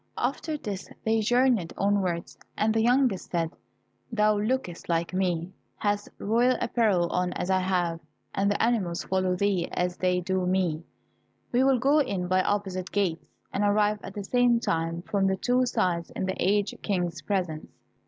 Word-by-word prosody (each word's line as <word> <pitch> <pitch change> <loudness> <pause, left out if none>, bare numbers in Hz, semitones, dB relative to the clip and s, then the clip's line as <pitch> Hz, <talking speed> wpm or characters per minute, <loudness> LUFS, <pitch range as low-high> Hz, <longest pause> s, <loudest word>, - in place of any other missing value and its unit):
After 310 -2 -2
this 200 -8 -6 0.2
they 225 0 +3
journeyed 240 -4 +2
onwards, 190 -4 0 0.2
and 215 +1 +2
the 225 - +2
youngest 245 -4 +2
said, 165 -2 -1 0.6
"Thou 210 -2 +3
lookest 215 -7 -2
like 170 +1 0
me, 180 -2 -1 0.2
hast 205 - -1
royal 240 +4 +2
apparel 205 -7 +2
on 180 0 0
as 185 - -2
I 190 - +3
have, 180 -3 0 0.3
and 200 +1 +1
the 205 - 0
animals 205 -7 +1
follow 185 -1 0
thee 190 -2 0
as 180 0 -1
they 180 -1 +1
do 185 0 -1
me; 180 -4 +1 0.7
we 250 +1 +3
will 265 -1 +4
go 280 +6 +3
in 190 -10 -1
by 185 +1 +3
opposite 185 -2 -2
gates, 185 -5 -1 0.3
and 205 - 0
arrive 210 +1 +2
at 195 - -9
the 205 - -4
same 245 +2 +3
time 165 -4 -1
from 195 0 +1
the 190 0 +1
two 250 +4 +2
sides 170 -6 0
in - - -2
the 190 - -2
aged 205 +2 +1
King's 180 -4 -1
presence." 180 -6 -2
195 Hz, 170 wpm, -27 LUFS, 180-220 Hz, 0.7 s, will